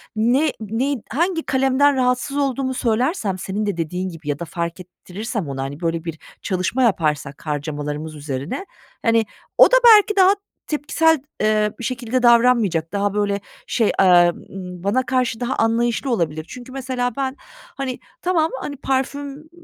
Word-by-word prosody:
ne 250 +8 +2
neyin 225 +4 -2
hangi 330 +5 0
kalemden 270 +1 +3
rahatsız 255 +2 0
olduğumu 270 -2 0
söylersem 235 - 0
senin 195 +3 -3
de 200 -4 -2
dediğin 180 +3 -2
gibi 165 -3 -8
ya 145 0 -1
da 170 - -4
fark 170 +2 -4
ettirirsem 185 +1 -6
ona, 135 -1 -3
hani, 140 +2 -6
böyle, 165 -1 -1
bir 165 -2 -6 0.2
çalışma 190 +7 0
yaparsak 150 - 0
harcamalarımız 150 +1 -4
üzerine, 145 - -4 0.4
hani, 230 -1 +3 0.3
o - - +10
da - - +6
belki 420 -2 +7
daha 385 0 +6 0.3
tepkisel, 315 0 +2 0.2
eee, 215 0 +2
bir - - -6
şekilde 245 +1 -2
davranmayacak, 235 -9 +4
daha, 200 0 0
böyle, 205 -1 0 0.3
şey, 225 -4 +2
eee, 175 -2 +6 0.2
ımm, 180 -2 -8
bana 220 +7 +1
karşı 255 -4 0
daha 250 +2 -1
anlayışlı 235 +3 +1
olabilir. 155 -7 -1
Çünkü, 250 0 -10
mesela, 255 -2 -2
ben, 265 -1 -1 0.4
hani, 265 -2 -3 0.2
tamam, 330 -3 +1
hani, 285 - -5
parfüm 280 +3 -3
225 Hz, 155 wpm, -21 LUFS, 175-265 Hz, 0.4 s, o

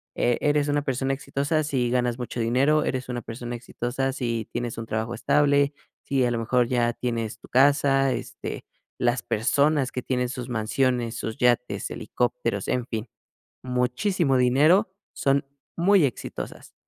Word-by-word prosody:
e 120 -1 +2
eres 145 0 +2
una 145 0 +1
persona 135 0 -1
exitosa 140 +3 -1
si 130 -5 0
ganas 125 -1 0
mucho 125 0 -5
dinero, 135 +7 +3
eres 130 -1 -2
una 120 -1 -3
persona 120 +1 -6
exitosa 125 +2 -3
si 115 -4 -2
tienes 120 -1 -3
un 115 - -4
trabajo 110 +2 -3
estable, 145 -1 +3 0.3
sí 135 -2 +1
a 120 - +1
lo 120 - 0
mejor 120 +1 +2
ya 120 -1 +1
tienes 115 -3 -3
tu - - -15
casa, 135 0 +4
este, - - -6 0.3
las 120 0 +1
personas 140 +4 +2
que 125 - -4
tienen 125 -1 -1
sus 125 -1 -5
mansiones, 120 +1 0
sus 110 - -4
yates, 125 0 +1
helicópteros, - - -2
en 125 -2 0
fin, 110 -1 -5 0.5
muchísimo 130 - +1
dinero, 150 - +4 0.2
son 140 0 +1 0.3
muy 185 -1 +5
exitosas. 130 - -6
125 Hz, 155 wpm, -25 LUFS, 120-140 Hz, 0.5 s, muy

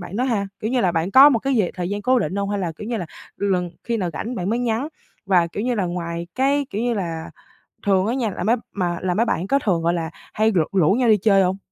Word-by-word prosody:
bạn 185 +3 -7
đó 250 - +1
ha? 210 -6 0
Kiểu 220 - -2
như 255 -1 +1
là, 180 -4 +2
bạn 165 +3 -1
có 270 +6 +9
một 235 - +2
cái 270 +2 -1
gì 205 -6 +2
thời 180 -1 -3
gian 205 0 -3
cố 255 +2 +3
định 195 - -2
hông, 200 0 -1
hay 205 - -1
là, 175 -4 -2
kiểu 210 +8 -8
như 235 - -1
là, 175 -5 -4 0.3
lần 185 -3 0
khi 235 0 -1
nào 180 -5 -2
rảnh 235 - -4
bạn 185 -2 -2
mới 235 - 0
nhắn? 245 +4 -1 0.4
Và, 180 -3 +4
kiểu 200 +5 -5
như 250 0 0
là, 200 -4 0
ngoài 170 -1 -4
cái 275 +1 +1
kiểu 210 +3 -2
như 240 -1 0
là, 165 -5 -4 0.6
thường 195 -1 +3
á 235 - 0
nha, 245 -5 0
là 175 - -5
mấy 230 +4 +3 0.2
mà 175 -3 -1
là 180 -1 0
mấy 225 +5 +2
bạn 190 -5 -1
có 275 +4 +2
thường, 180 -9 0
gọi 170 +1 +1
là, 165 -2 -2 0.2
hay 220 +1 +2
rủ 170 -5 +3
rủ 185 -4 +3
nhau 240 +1 +2
đi 215 - +6
chơi 195 -1 +4
hông? 185 +1 0
200 Hz, 290 wpm, -22 LUFS, 180-235 Hz, 0.6 s, có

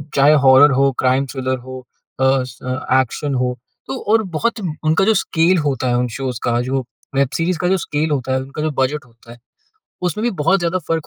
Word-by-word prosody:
चाहे 145 +2 +5
हॉरर 135 +2 +7
हो, 135 +1 +3
crime 130 +1 +2
thriller 130 -1 -2
हो, 130 +1 -9 0.4
अ, 130 0 +3
स 125 -1 -11 0.4
एक्शन 135 +3 -3
हो। 125 0 0 0.3
तो 135 - -4 0.2
और 225 -1 +4
बहुत 235 +3 -1 0.2
उनका 160 +5 +2
जो 220 - +4
स्केल 180 -1 +2
होता 135 -4 -1
है 120 - +1
उन 125 0 0
शोज़ 130 -3 -4
का 120 0 +1
जो 130 +1 -1 0.3
वेब 140 -1 +2
सीरीज़ 170 +1 0
का 180 - 0
जो 190 +1 +2
स्केल 155 -1 -2
होता 130 -2 -1
है 130 - 0
उनका 135 +3 -7
जो 155 0 -1
बजट 140 +1 -1
होता 115 0 -18
है। 120 - -12 0.7
उसमें 210 +6 -4
भी 240 - +2
बहुत 195 +5 +3
ज़्यादा 175 +2 0
फ़र्क 165 -2 -1
135 Hz, 210 wpm, -19 LUFS, 130-160 Hz, 0.7 s, हॉरर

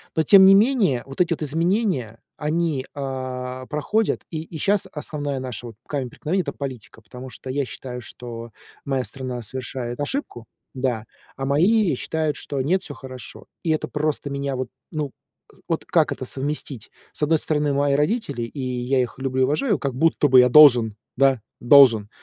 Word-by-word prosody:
Но 160 - +3
тем 190 +5 +8
не 195 0 +8
менее 205 - +3
вот 135 +5 -3
эти 170 - +2
вот 160 - -7
изменения, 165 - 0 0.2
они, 150 -3 -1
а, 130 -2 -5
проходят. 210 +9 0
И 155 -1 -3
и 165 -1 -9
щас 200 +4 +1
основная 145 -2 -4
наша 125 -2 -6
вот, 115 - -10
камень 135 -4 -3
преткновения- 185 +9 -1
это - - -4
политика, 125 -5 -7
потому 125 +4 -10
что 130 - -10
я 140 +2 0
считаю, 125 -1 -7
что 115 0 -9 0.3
моя 135 -2 -1
страна 130 -3 -6
совершает 120 +1 -5
ошибку. 145 - -4 0.3
Да. 125 -4 -2 0.3
А 135 - -3
мои 175 - +3
считают, 155 +2 -2
что 140 -2 -5
нет, 180 +7 +1
всё 145 - -8
хорошо. 130 -1 -10 0.2
И 165 - -2
это 155 - 0
просто 150 -1 -2
меня 140 -1 -3
вот 130 -1 -3 0.2
ну, 150 -4 -3 0.6
вот - - -1
как - - +2
это - - -4
совместить? 140 -3 -5 0.2
С - - -4
одной 160 +2 +3
стороны- 150 -2 0
мои 140 0 +2
родители, 150 - 0
и 135 +4 -6
я 125 +1 -1
их 120 -1 -4
люблю 130 -1 -1
и - - +5
уважаю, 195 - +1
как 135 -3 -3
будто 160 0 +3
бы 130 -1 +7
я 125 - +4
должен, 120 -7 +7 0.2
да, 135 -3 +3 0.2
должен. 120 -5 +6
140 Hz, 180 wpm, -23 LUFS, 125-155 Hz, 0.6 s, тем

